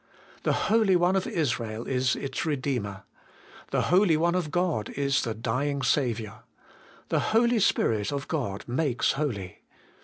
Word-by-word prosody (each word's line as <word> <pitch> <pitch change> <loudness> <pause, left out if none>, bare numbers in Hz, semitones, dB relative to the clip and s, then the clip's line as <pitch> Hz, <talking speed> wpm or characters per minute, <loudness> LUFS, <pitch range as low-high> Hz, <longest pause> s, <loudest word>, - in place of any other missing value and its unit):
The - - +1 0.2
Holy 215 -5 +4
One 180 +2 +3
of 190 - 0
Israel 120 -8 -2
is 130 -1 +1
its 135 -2 -4
Redeemer. 130 - -2 0.7
The - - +1
Holy 180 -4 +5
One 170 +2 +2
of 180 -4 -1
God 175 - 0
is 140 0 0
"the 115 -3 -3
dying 135 +5 -1
Saviour. 115 -7 0 0.7
The - - +2 0.2
Holy 235 0 +3
Spirit 110 - +1
of 140 0 -4
God 115 -11 -3
makes 125 0 +1
holy. 115 - -4
140 Hz, 145 wpm, -27 LUFS, 115-170 Hz, 0.7 s, Holy